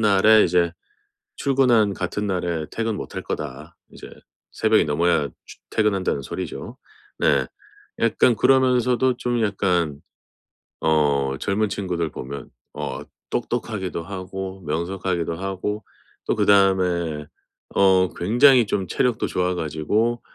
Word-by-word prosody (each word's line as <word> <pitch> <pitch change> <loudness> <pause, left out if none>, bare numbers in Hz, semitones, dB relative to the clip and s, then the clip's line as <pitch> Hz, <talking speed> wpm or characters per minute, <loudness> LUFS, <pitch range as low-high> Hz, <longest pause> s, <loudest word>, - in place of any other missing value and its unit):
날에 110 +1 +5
이제 85 -1 +2 0.6
출근한 125 -7 +3
같은 95 +3 -3
날에 85 -4 -2
퇴근 115 -1 -2
못할 - - -6
거다." 75 +6 -6 0.2
이제 - - -11 0.4
새벽이 - - +3
넘어야 75 -1 +1 0.2
추 - - -13
퇴근한다는 100 -9 0
소리죠. - - -6 0.4
네. - - +3 0.5
약간 120 - +3
그러면서도 125 0 +3
좀 120 -2 -1
약간 90 -8 0 0.8
어 70 -3 +2
젊은 105 +2 0
친구들 90 -5 -2
보면 70 -1 -8 0.2
어 - - -5 0.3
똑똑하기도 95 -5 -3
하고 95 +1 -6
명석하기도 85 +1 -2
하고 95 +3 -4 0.4
또 - - +1
그다음에 90 -6 +2 0.5
어 95 -1 +5
굉장히 120 +6 +5
좀 95 -2 -2
체력도 125 +3 0
좋아 90 0 0
가지고 90 +10 -1
95 Hz, 255 characters per minute, -23 LUFS, 85-110 Hz, 0.8 s, 날에